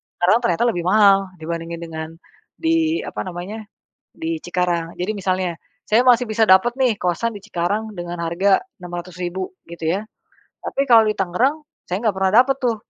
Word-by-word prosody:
Tangerang 185 Hz, +6 st, +3 dB
ternyata 175 Hz, +4 st, +1 dB
lebih 175 Hz, -4 st, -3 dB
mahal 200 Hz, -1 st, +6 dB, 0.2 s
dibandingkan 165 Hz, +1 st, -5 dB
dengan 160 Hz, -1 st, -6 dB, 0.5 s
di 325 Hz, 0 st, +1 dB
apa -, -, -5 dB
namanya 185 Hz, +5 st, -6 dB, 0.5 s
di 160 Hz, 0 st, -3 dB
Cikarang. 175 Hz, -2 st, -1 dB
Jadi 185 Hz, +4 st, -1 dB
misalnya, 185 Hz, -2 st, -1 dB, 0.4 s
saya 220 Hz, +3 st, +4 dB
masih 250 Hz, -1 st, +5 dB
bisa 220 Hz, +1 st, +2 dB
dapat 190 Hz, +5 st, +5 dB
nih 255 Hz, -5 st, +1 dB
kosan 180 Hz, +6 st, 0 dB
di -, -, -7 dB
Cikarang 210 Hz, +3 st, -2 dB
dengan 175 Hz, -1 st, -6 dB
harga 175 Hz, +4 st, +2 dB, 0.2 s
600.000 180 Hz, +1 st, -5 dB, 0.2 s
gitu 165 Hz, -2 st, -5 dB
ya. -, -, -4 dB, 0.6 s
Tapi 275 Hz, -, -1 dB
kalau 230 Hz, -2 st, +7 dB
di 215 Hz, -, +2 dB
Tangerang 250 Hz, -, +1 dB, 0.2 s
saya 180 Hz, +2 st, -2 dB
ga 205 Hz, -, 0 dB
pernah 190 Hz, 0 st, +1 dB
dapat 270 Hz, +1 st, 0 dB
tuh 240 Hz, -3 st, +1 dB
190 Hz, 165 wpm, -21 LUFS, 175-220 Hz, 0.6 s, kalau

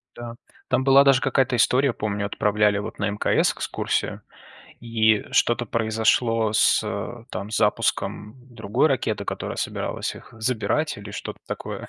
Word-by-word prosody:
Да, 120 Hz, -1 st, -8 dB, 0.3 s
там 130 Hz, 0 st, +1 dB
была 135 Hz, +1 st, +6 dB
даже 135 Hz, -2 st, +4 dB
какая-то 135 Hz, -2 st, +1 dB
история, 125 Hz, +2 st, +3 dB
помню, 105 Hz, -1 st, -3 dB
отправляли 105 Hz, 0 st, +1 dB
вот 105 Hz, -, -7 dB
на 105 Hz, -1 st, 0 dB
МКС 105 Hz, -, +1 dB
экскурсию, -, -, -3 dB, 0.6 s
и 110 Hz, -2 st, +2 dB
что-то 120 Hz, 0 st, +2 dB
произошло 110 Hz, 0 st, +1 dB
с, 105 Hz, -, +4 dB
э, -, -, -5 dB
там 100 Hz, +2 st, -5 dB
запуском 105 Hz, +1 st, 0 dB, 0.2 s
другой 115 Hz, +6 st, +1 dB
ракеты, 135 Hz, -4 st, -1 dB
которая -, -, -5 dB
собиралась -, -, -3 dB
их -, -, -13 dB
забирать, 115 Hz, +5 st, -1 dB
или 100 Hz, -, -9 dB
что-то -, -, -7 dB
такое. -, -, -6 dB
115 Hz, 140 wpm, -23 LUFS, 105-125 Hz, 0.6 s, была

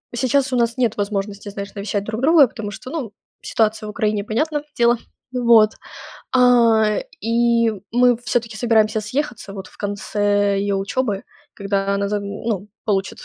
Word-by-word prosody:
сейчас 260 Hz, +2 st, +1 dB
у -, -, +2 dB
нас 235 Hz, -1 st, +1 dB
нет 235 Hz, -4 st, +1 dB
возможности, 200 Hz, 0 st, -3 dB
знаешь, 200 Hz, 0 st, -7 dB
навещать 200 Hz, 0 st, -2 dB
друг 220 Hz, +1 st, -4 dB
друга, 300 Hz, -1 st, +6 dB
потому 210 Hz, -2 st, -6 dB
что, 255 Hz, -, -9 dB
ну, 260 Hz, -10 st, -4 dB, 0.3 s
ситуация 215 Hz, -1 st, 0 dB
в -, -, -5 dB
Украине- 210 Hz, -2 st, -1 dB
понятно 295 Hz, +7 st, -1 dB
дело. 235 Hz, 0 st, +4 dB, 0.4 s
Вот. 235 Hz, -3 st, +5 dB, 0.6 s
А, 230 Hz, -4 st, +4 dB, 0.2 s
и 230 Hz, 0 st, +2 dB, 0.2 s
мы 245 Hz, +1 st, +4 dB
всё-таки 230 Hz, -1 st, -2 dB
собираемся 220 Hz, -2 st, +2 dB
съехаться 240 Hz, -2 st, -4 dB
вот 190 Hz, -2 st, -7 dB
в -, -, -19 dB
конце 205 Hz, 0 st, 0 dB
ее 200 Hz, 0 st, 0 dB
учебы, 200 Hz, +1 st, -2 dB, 0.3 s
когда 200 Hz, 0 st, -1 dB
она 200 Hz, 0 st, -1 dB
за 210 Hz, -, 0 dB
ну, 200 Hz, 0 st, -4 dB, 0.2 s
получит 195 Hz, -3 st, -1 dB
215 Hz, 155 wpm, -20 LUFS, 205-240 Hz, 0.6 s, друга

